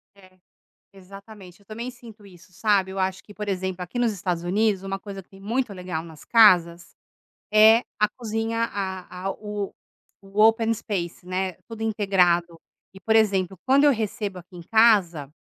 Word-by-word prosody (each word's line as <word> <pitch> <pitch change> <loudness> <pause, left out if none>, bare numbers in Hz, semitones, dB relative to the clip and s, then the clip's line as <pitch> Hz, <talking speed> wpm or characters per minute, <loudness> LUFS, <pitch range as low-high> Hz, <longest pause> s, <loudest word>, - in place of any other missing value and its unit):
É, 185 -1 -21 0.5
exatamente, 195 -1 -14
eu 200 - -25
também 230 +4 -6
sinto 230 -4 -15
isso, 185 -1 -18
sabe. 195 -1 +1
Eu 190 - -5
acho 185 0 -2
que, 205 - -15
por 210 0 -6
exemplo, 190 -1 -3
aqui 180 +7 -8
nos 235 -2 +2
Estados 180 -4 -3
Unidos, 200 +2 +1
uma 195 0 -4
coisa 195 -1 -8
que - - -42
tem 195 - -16
muito 230 +1 -2
legal 180 -3 -5
nas 160 -2 -13
casas, 175 -7 +4 0.6
é 215 +2 +7 0.2
a 210 - +4
cozinha 225 0 -3
a 190 -2 -6
a - - 0
o 210 -1 -6 0.5
o 195 +2 -2
open 225 +1 +4
space, 180 -5 -5
né, 185 +1 -2
tudo 225 -1 -10
integrado. 180 -6 +1 0.3
E, 195 - -13
por 220 +3 +1
exemplo, 195 -4 +2
quando 275 +2 +4
eu 290 - +6
recebo 210 -4 -3
aqui 180 +1 -15
em 175 - -9
casa 185 -9 +3
195 Hz, 175 wpm, -24 LUFS, 185-220 Hz, 0.6 s, é